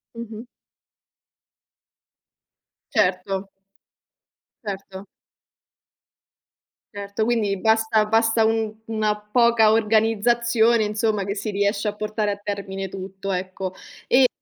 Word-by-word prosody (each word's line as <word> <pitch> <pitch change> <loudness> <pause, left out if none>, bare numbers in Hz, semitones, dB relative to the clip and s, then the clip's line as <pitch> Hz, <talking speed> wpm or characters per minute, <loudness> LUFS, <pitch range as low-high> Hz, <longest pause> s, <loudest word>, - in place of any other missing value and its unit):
Mh-mh. 230 0 -8 2.5
Certo. 195 0 0 1.1
Certo. 195 -1 -7 1.9
Certo, 200 +2 -3
quindi 215 -5 +1
basta 220 +1 +2
basta 225 +1 +3
un 220 -1 0
una 215 -1 0
poca 225 0 +4
organizzazione, 225 +1 +3
insomma, 210 -1 0
che 200 +1 -3
si 215 +1 -3
riesce 200 +1 0
a - - -5
portare 210 0 -2
a 200 - -4
termine 195 -1 -4
tutto, 195 +1 -6
ecco 185 0 -4 0.3
e 255 +1 +5
215 Hz, 90 wpm, -23 LUFS, 200-225 Hz, 2.5 s, e